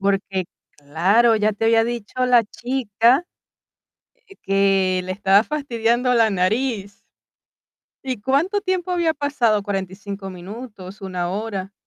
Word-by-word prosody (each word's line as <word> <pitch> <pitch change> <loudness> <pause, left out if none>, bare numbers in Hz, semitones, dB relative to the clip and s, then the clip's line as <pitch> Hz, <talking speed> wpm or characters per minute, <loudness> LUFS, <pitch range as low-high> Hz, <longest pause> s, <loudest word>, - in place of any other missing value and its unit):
Porque, 195 -1 0 0.3
claro, 190 +11 +3
ya 215 0 +1
te 210 +2 -4
había 225 0 +4
dicho 240 +2 -3
la 245 -2 +5
chica, 240 - +1 1.0
eh, 390 - -17
que 195 -2 +2
le 185 - -3
estaba 195 +1 +4
fastidiando 250 -4 0
la 225 -2 +4
nariz, 205 +2 -1 1.0
¿y 255 -5 -4
cuánto 305 - +1
tiempo 370 -2 -2
había 340 -3 +1
pasado? 250 -8 +1
¿45, 195 0 -5
minutos, 200 +1 -10
1 180 -2 -3
hora? 200 -1 -4
215 Hz, 120 wpm, -21 LUFS, 195-250 Hz, 1.0 s, la